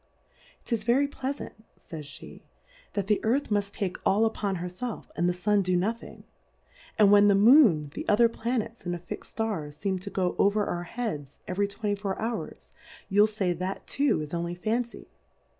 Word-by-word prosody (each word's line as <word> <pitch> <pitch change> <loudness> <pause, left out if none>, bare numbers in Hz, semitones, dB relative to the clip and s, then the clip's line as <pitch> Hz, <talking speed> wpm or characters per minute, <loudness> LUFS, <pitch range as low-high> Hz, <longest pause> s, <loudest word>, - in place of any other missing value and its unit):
'Tis 230 -4 -1
very 250 +5 +3
plea 270 -1 -3
fant, 285 - -7 0.3
fays 160 -2 -8
fhCj 145 - -11 0.5
that 200 -2 -1
the 210 0 +1
Earth 250 +3 +1
muft 205 -1 0
take 195 -4 -3
all 210 +3 +3
upon 205 -3 -1
her 175 0 -4
felf, 205 +6 -6
and 175 +1 +1
the - - +3
Sua 205 +4 +1
do 185 -1 +1
no 190 +5 +2
thing: 230 - -12 0.7
And 205 -2 +6
when 205 0 +7
the 200 - +5
Moon, 200 - +6
the - - -6
other 230 +3 +6
Planets, 230 0 -3
and 175 -1 -2
the - - -4
fix'd 170 0 -8
Stars 170 -10 -3
feem 190 -2 -2
to 200 - -6
go 185 -2 -1
over 205 +1 +3
our 175 0 -3
Heads 175 - -5
every 200 +2 0
twenty 205 +1 -2
four 200 -1 -3
Hours, 225 +1 -5 0.4
you'll 205 +2 +5
fay 200 -4 -1
That 185 +3 -4
too 275 - +1
is 150 - -9
only 170 0 -2
Fan 220 +7 0
cy 235 - -13
205 Hz, 190 wpm, -27 LUFS, 180-225 Hz, 0.7 s, when